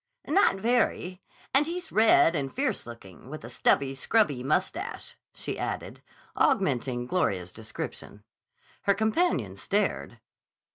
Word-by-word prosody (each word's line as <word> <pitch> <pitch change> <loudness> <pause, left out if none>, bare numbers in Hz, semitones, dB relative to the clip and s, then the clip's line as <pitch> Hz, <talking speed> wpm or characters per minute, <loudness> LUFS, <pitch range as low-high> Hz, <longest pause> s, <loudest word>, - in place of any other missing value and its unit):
"Not 390 - +4
very. 195 -4 0 0.3
And 285 +3 +4
he's 355 +2 -5
red 215 -6 +5
and 135 -3 -2
fierce 260 - -2
looking, 115 -1 -12
with 155 +2 -8
a 115 - -8
stubby, 135 +2 +2
scrubby 145 - +1
mustache," 135 +4 -2 0.2
she - - -5
added, - - -4 0.3
augmenting 120 0 +1
Gloria's 95 - -1
description. 110 +2 -7 0.6
Her 200 - +4
companion 220 - +1
stared. - - -1
165 Hz, 115 wpm, -28 LUFS, -, 0.6 s, red